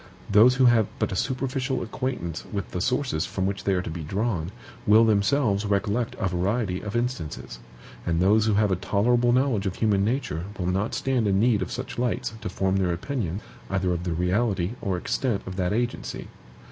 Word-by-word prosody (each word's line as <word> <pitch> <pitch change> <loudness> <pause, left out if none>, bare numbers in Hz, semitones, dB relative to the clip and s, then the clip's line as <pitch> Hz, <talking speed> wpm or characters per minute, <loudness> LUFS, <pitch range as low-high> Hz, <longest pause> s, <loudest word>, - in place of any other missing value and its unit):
Those 115 +5 +7
who 130 0 +4
have 120 -3 +5
but - - -1
a - - -2
superficial 130 +3 -1
acquaintance 115 - -4
with 100 -3 -4
the 90 - -3
sources 125 - 0
from 95 - -2
which 95 0 -3
they 100 - +2
are 90 - 0
to - - -5
be 85 +1 -5
drawn, 95 +1 -2 0.4
will 110 +2 +7
themselves 105 0 +2
recollect 105 +3 0
a 100 - 0
variety 95 +2 -1
of 105 +1 -5
instances; 120 - -3 0.4
and 85 -1 0
those 105 +4 +4
who 105 - +3
have 105 -1 +3
a - - +3
tolerable 120 +6 +2
knowledge 125 -6 +2
of 95 - -3
human 105 -3 +2
nature 105 - -1
will 90 - -2
not 95 +4 0
stand 130 -5 +1
in 95 -1 +2
need 110 -2 +3
of 95 - -3
such - - -5
lights 120 -2 -1
to - - -3
form 95 0 0
their 95 -2 +1
opinion 95 - -3 0.3
either 95 -2 0
of 85 0 -3
the 90 -2 -1
reality 90 +2 0
or 95 -4 -1
extent 115 +4 -1
of 95 - -6
that 90 -2 0
agency. 120 +3 -2
100 Hz, 195 wpm, -25 LUFS, 90-120 Hz, 0.4 s, Those